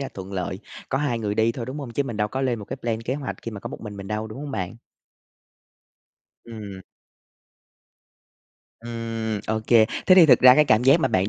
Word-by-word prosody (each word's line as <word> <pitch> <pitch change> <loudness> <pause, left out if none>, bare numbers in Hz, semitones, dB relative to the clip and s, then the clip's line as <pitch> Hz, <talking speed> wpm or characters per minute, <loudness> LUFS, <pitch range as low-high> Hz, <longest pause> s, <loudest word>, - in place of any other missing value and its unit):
ra 135 - -4
thuận 95 0 -8
lợi, 90 0 -3 0.3
có 135 - 0
2 125 -5 -1
người 105 -2 -2
đi 110 +1 +2
thôi, 120 -1 -6
đúng 135 +4 -6
hông? 135 -5 -6
Chứ 140 - 0
mình 120 -6 -6
đâu 105 0 0
có 130 +5 -4
lên 120 -3 0
một 105 - -8
cái 130 - -6
plan, 115 -3 -3
kế 130 +3 -2
hoạch 140 -2 -5
khi 115 - -5
mà 100 -3 -8
có - - -6
một - - -9
mình 105 -2 -8
mình 100 -1 -8
đâu, 110 +1 -3
đúng 110 +5 -9
hông 145 - -6
bạn? 95 -3 -4 1.7
Ừm. 105 -4 -9 2.0
Ừm, 115 -2 -4
OK. 110 0 -2 0.4
Thế 185 - +8
thì 175 -4 +8
thực 125 -4 +6
ra 125 0 +9
cái 150 - +5
cảm 110 -3 +3
giác 140 +5 +5
mà - - +2
bạn 95 +2 +1
115 Hz, 225 wpm, -24 LUFS, 105-130 Hz, 2.0 s, ra